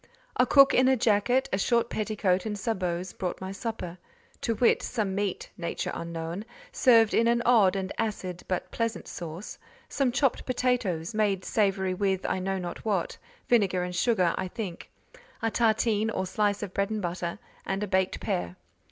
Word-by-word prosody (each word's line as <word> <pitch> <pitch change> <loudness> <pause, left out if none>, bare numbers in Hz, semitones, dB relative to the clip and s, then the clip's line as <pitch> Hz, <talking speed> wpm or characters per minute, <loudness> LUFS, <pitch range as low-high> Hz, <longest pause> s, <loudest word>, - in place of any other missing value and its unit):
A - - +3
cook 275 -1 +7
in 255 +1 +5
a 265 0 +4
jacket, 235 +4 +2
a 190 - +1
short 235 +2 +1
petticoat 210 -3 0
and 210 -1 -3
sabots, 185 -4 -2
brought 180 -2 -4
my 190 0 -5
supper: 195 -4 -5 0.4
to 230 - 0
wit—some 215 -3 +1
meat, 200 -1 -2
nature 170 - -3
unknown, 170 +3 -5 0.3
served 230 -4 +5
in 230 - +4
an 235 0 +2
odd 210 -6 +5
and 190 -1 -3
acid, 190 -5 -3
but 185 - -2
pleasant 230 -1 -2
sauce; 170 +3 -7 0.3
some 270 -3 +1
chopped 270 +1 +1
potatoes, 235 -9 0
made 205 -3 +1
savoury 195 -3 +1
with, 190 0 0
I - - 0
know 190 +1 -1
not 175 -2 -6
what: 200 -6 -1 0.3
vinegar 195 -6 +3
and 180 0 -4
sugar, 185 -4 +2
I 185 - -2
think: 185 -2 -6 0.5
a 225 -2 -1
tartine, 220 -1 +2
or 190 - -2
slice 205 +1 0
of 195 -2 -6
bread 200 0 0
and 215 -1 -2
butter, 175 0 -3 0.3
and 195 +2 -2
a - - -2
baked 190 -1 +1
pear. 90 0 -2
200 Hz, 170 wpm, -28 LUFS, 185-225 Hz, 0.5 s, cook